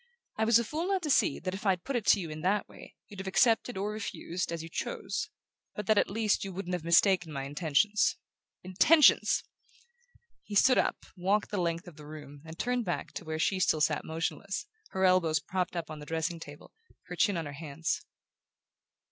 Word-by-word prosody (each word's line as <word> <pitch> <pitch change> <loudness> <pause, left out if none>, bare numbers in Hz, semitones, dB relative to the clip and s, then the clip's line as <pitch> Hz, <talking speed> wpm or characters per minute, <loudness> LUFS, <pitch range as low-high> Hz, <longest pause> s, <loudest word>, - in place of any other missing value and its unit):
I 220 - +1
was 230 0 +6
a 235 - +1
fool 315 +9 -3
not 385 -2 0
to 300 - 0
see 140 - +3
that 185 +1 -4
if 195 - -6
I'd 185 -4 +1
put 275 - -3
it 225 -4 -2
to 200 - +6
you 165 -4 -5
in 155 0 -7
that 200 +4 +1
way - - -14
you'd 200 - -11
have 190 - -6
accepted 225 +3 +2
or 205 +2 -2
refused, 185 -5 -4
as 165 -1 -4
you - - -7
chose; 165 - -4 0.5
but 210 - -4
that 215 0 +4
at - - +1
least 215 0 +1
you 195 - -5
wouldn't 180 -1 -5
have 175 -3 -2
mistaken 175 0 +4
my 135 -2 -4
intentions. 160 +9 +1 0.5
Intentions!" 280 - +5 1.0
He 205 - -8
stood 255 +5 +5
up, - - -1
walked 195 +3 0
the 200 -3 -1
length 170 0 -2
of 165 -3 -12
the 150 -1 -11
room, 145 -2 -10
and 160 +1 -9
turned 245 +2 0
back 175 -4 -3
to - - -7
where 155 0 -3
she 190 +4 +1
still 160 -4 +2
sat 150 0 +1
motionless, 165 - -3 0.2
her 190 0 0
elbows 180 -4 +4
propped 185 +4 -3
on 155 -1 -8
the 150 - -10
dressing 165 +1 -2
table, 145 -2 -12 0.3
her - - -7
chin 200 -4 +2
on 165 - -3
her 145 - -7
hands. 155 +2 -3
185 Hz, 205 wpm, -30 LUFS, 160-210 Hz, 1.0 s, was